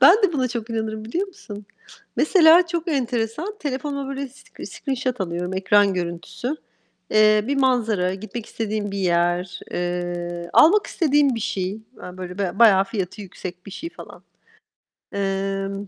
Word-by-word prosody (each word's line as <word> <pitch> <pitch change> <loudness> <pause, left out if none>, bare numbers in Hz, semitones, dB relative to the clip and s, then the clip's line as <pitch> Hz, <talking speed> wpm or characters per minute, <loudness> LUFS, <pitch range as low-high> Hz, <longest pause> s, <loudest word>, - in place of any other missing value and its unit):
Ben 380 - +8
de 365 -4 +4
buna 260 -4 0
çok 235 -2 -5
inanırım 220 -1 -3
biliyor 340 - -2
musun? 225 - -11 0.5
Mesela 335 +1 +6
çok 340 0 -3
enteresan, 260 - -2
telefonuma 280 -1 -3
böyle 275 0 -4
sc 270 +3 -12
screenshot 255 -3 -3
alıyorum, 180 0 -2
ekran 200 +1 +3
görüntüsü. 180 - -4 0.5
Eee, 215 0 +5
bir 280 - 0
manzara, 225 -9 +2
gitmek 220 +3 -7
istediğim 215 -2 -3
bir 200 - -4
yer, 175 0 +1
eee, 175 -1 -3
almak 405 +7 +6
istediğim 290 -5 +2
bir 230 - -4
şey, 195 0 -2 0.2
hani, 180 0 -9
böyle 180 0 -7
ba 195 -1 -2
bayağı 200 -5 +7
fiyatı 195 -1 -4
yüksek 180 -1 -9
bir - - -8
şey, 330 - -6
falan. - - -12 0.9
Emm, 195 0 -2
215 Hz, 145 wpm, -23 LUFS, 190-275 Hz, 0.9 s, Ben